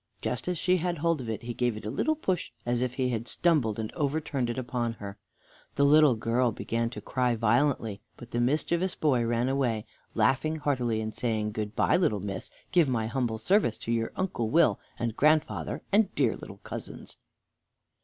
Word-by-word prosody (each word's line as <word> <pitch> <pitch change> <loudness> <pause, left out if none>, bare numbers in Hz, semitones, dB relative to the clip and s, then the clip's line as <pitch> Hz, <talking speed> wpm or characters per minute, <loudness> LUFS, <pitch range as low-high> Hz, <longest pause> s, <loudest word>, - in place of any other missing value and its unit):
Just 125 - -3
as 180 -1 0
she 180 +3 +2
had 175 0 -1
hold 165 -1 +1
of 120 - -6
it 110 - -4
he 120 0 -4
gave 120 -2 0
it 110 - -9
a 105 - -2
little 315 - +1
push, 190 - -1 0.2
as 120 0 0
if 125 -1 -1
he 130 -2 0
had 115 -1 -3
stumbled, 145 -12 +1
and 110 -1 -4
overturned 145 -4 -1
it 120 - -3
upon 120 -2 -2
her. 100 -2 -9 0.6
The 140 - +4
little 150 -2 +6
girl 115 +2 +1
began 115 +2 -2
to 120 - -8
cry 125 -2 0
violently, 115 -2 +1 0.2
but 120 - -12
the 120 - 0
mischievous 165 +8 +1
boy 130 -6 +2
ran 120 +1 +1
away, 125 -5 0 0.3
laughing 135 +8 +2
heartily, 125 -7 0
and 110 0 -4
saying: 110 -3 -1
"Good 105 0 -4
by, - - +3
little 115 - +1
miss! 95 -1 -5 0.2
Give 170 -6 +4
my 115 -3 0
humble 115 -1 -1
service 120 - +2
to 115 - -4
your 115 -1 0
Uncle 175 -12 -1
Will, 140 - +4 0.2
and 115 -1 -2
grandfather, 155 +3 +1
and 210 +2 +5
the - - -19
dear 130 -6 +2
little 100 - -10
cousins." - - -8
120 Hz, 195 wpm, -28 LUFS, 115-150 Hz, 0.6 s, little